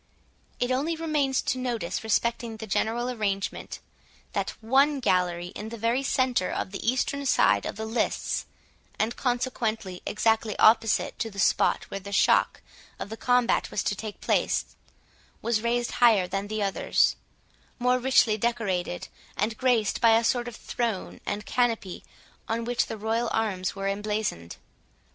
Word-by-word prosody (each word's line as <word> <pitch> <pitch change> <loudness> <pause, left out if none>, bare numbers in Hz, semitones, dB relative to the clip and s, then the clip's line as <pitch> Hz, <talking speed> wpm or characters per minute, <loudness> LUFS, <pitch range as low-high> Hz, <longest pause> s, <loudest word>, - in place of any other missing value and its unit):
It 245 +1 0
only 290 +6 0
remains 300 -5 0
to 255 - -1
notice 235 -9 -2
respecting 230 +1 0
the 220 - -6
general 225 +4 0
arrangement, 205 -5 -3 0.6
that - - -2
one 275 +5 +3
gallery 180 -5 +1
in 210 +3 -7
the 230 - -7
very 230 +4 +1
centre 255 -7 +1
of - - -3
the 195 - -6
eastern 280 +2 -1
side 100 - +3
of - - -5
the 220 +1 -4
lists, 225 +2 -1 0.5
and 225 +2 0
consequently 225 -6 -2
exactly 220 0 +1
opposite 225 0 +3
to 225 - -1
the 200 - -14
spot 195 - +2
where 195 - -3
the 200 +1 -9
shock 200 - +3 0.4
of - - -6
the 220 - -5
combat 245 +1 +2
was 200 - -2
to 205 - 0
take 210 0 -7
place, - - 0 0.6
was 230 -2 0
raised 235 +1 0
higher 220 -7 +4
than 195 +2 -3
the 215 0 -2
others, 195 -1 +2 0.6
more 250 0 +2
richly 245 -4 +4
decorated, 200 -7 -1 0.3
and 220 +2 0
graced 240 -4 +1
by 225 -1 +6
a 230 - +1
sort 240 +1 +1
of 240 - -7
throne 230 -6 -3
and 205 +1 -3
canopy, 230 -7 -1 0.5
on 230 +1 -1
which 245 0 0
the 220 - -5
royal 225 +2 -1
arms 195 -5 -1
were 195 0 -3
emblazoned. 205 - -2
225 Hz, 155 wpm, -27 LUFS, 205-245 Hz, 0.6 s, by